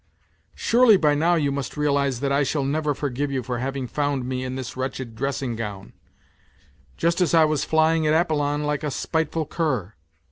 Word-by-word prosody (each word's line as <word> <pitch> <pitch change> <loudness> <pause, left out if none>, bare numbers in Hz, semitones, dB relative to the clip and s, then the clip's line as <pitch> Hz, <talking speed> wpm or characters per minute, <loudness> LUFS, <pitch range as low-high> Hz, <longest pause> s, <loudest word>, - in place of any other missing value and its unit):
Surely 235 -3 +5
by 150 -4 +3
now 165 +4 +2
you 145 -4 +1
must 140 +1 -4
realize 140 -4 +1
that 140 -1 0
I 140 +1 +3
shall 140 +1 0
never 145 +1 0
forgive 145 0 -2
you 130 -2 -2
for 120 0 -3
having 135 +1 -3
found 145 -1 -1
me 130 0 -3
in 130 0 -4
this 130 -2 -6
wretched 130 -2 -4
dressing 135 -1 -2
gown, 105 -3 -6 1.0
just 170 +2 +1
as 175 -1 +3
I 160 -1 +6
was 155 -1 0
flying 160 0 +2
at 155 +1 +4
Apollon 145 -3 0
like 150 0 -1
a 150 - -1
spiteful 160 +2 -1
cur. 130 - -2
145 Hz, 185 wpm, -24 LUFS, 130-155 Hz, 1.0 s, I